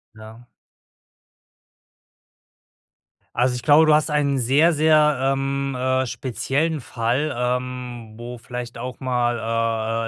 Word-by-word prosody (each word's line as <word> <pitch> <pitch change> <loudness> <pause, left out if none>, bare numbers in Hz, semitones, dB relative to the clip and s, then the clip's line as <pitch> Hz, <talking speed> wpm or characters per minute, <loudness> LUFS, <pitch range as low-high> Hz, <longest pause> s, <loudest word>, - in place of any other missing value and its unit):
Ja. 110 +2 -13 2.9
Also 125 +1 +2
ich 125 - -5
glaube, 155 +1 +6
du 155 - +5
hast 155 +1 +2
einen 145 -2 +1
sehr, 140 +8 +4
sehr, 150 -2 +3
ähm, 135 0 -1
äh, 130 +1 +1
speziellen 140 +6 -2
Fall, 125 +4 -2
ähm, 125 -2 -3
wo 120 +2 -8
vielleicht 120 0 -7
auch 125 +2 -7
mal, 115 -2 -1
125 Hz, 105 wpm, -22 LUFS, 120-140 Hz, 2.9 s, glaube